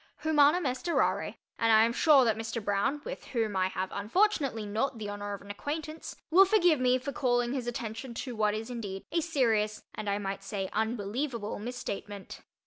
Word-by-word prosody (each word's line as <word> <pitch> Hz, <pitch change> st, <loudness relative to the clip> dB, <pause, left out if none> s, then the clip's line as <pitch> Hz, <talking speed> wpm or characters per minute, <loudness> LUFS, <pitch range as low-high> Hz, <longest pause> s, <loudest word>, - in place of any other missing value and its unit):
Humanum 310 Hz, +2 st, +4 dB
est 255 Hz, +5 st, -2 dB
errare, -, -, +1 dB, 0.2 s
and 230 Hz, -1 st, +3 dB
I 220 Hz, 0 st, +7 dB
am 235 Hz, -, 0 dB
sure 285 Hz, -2 st, +6 dB
that 225 Hz, -2 st, +2 dB
Mr. 225 Hz, +1 st, -4 dB
Broun 215 Hz, +8 st, 0 dB
(with -, -, -6 dB
whom 225 Hz, -5 st, -1 dB
I 185 Hz, 0 st, +2 dB
have 190 Hz, 0 st, -3 dB
unfortunately 255 Hz, -, +1 dB
not 225 Hz, +5 st, -1 dB
the 210 Hz, -2 st, -5 dB
honour 205 Hz, 0 st, -4 dB
of 200 Hz, -, -13 dB
an 200 Hz, -, -7 dB
acquaintance) 310 Hz, +8 st, -5 dB, 0.2 s
will 370 Hz, +4 st, +8 dB
forgive 360 Hz, -7 st, +4 dB
me 255 Hz, 0 st, +3 dB
for 265 Hz, +2 st, -5 dB
calling 245 Hz, -2 st, +1 dB
his 255 Hz, -3 st, -3 dB
attention 235 Hz, +1 st, -5 dB
to 250 Hz, 0 st, -5 dB
what 210 Hz, -1 st, +1 dB
is 220 Hz, +3 st, -5 dB
indeed 200 Hz, -5 st, -5 dB
a 335 Hz, -, +1 dB
serious, 225 Hz, -10 st, +1 dB
and 215 Hz, -1 st, -4 dB
I 200 Hz, -, +1 dB
might 195 Hz, -1 st, -4 dB
say, 195 Hz, -1 st, -4 dB
unbelievable, 220 Hz, +2 st, -2 dB
misstatement. 205 Hz, -4 st, -6 dB
230 Hz, 190 wpm, -30 LUFS, 205-275 Hz, 0.2 s, will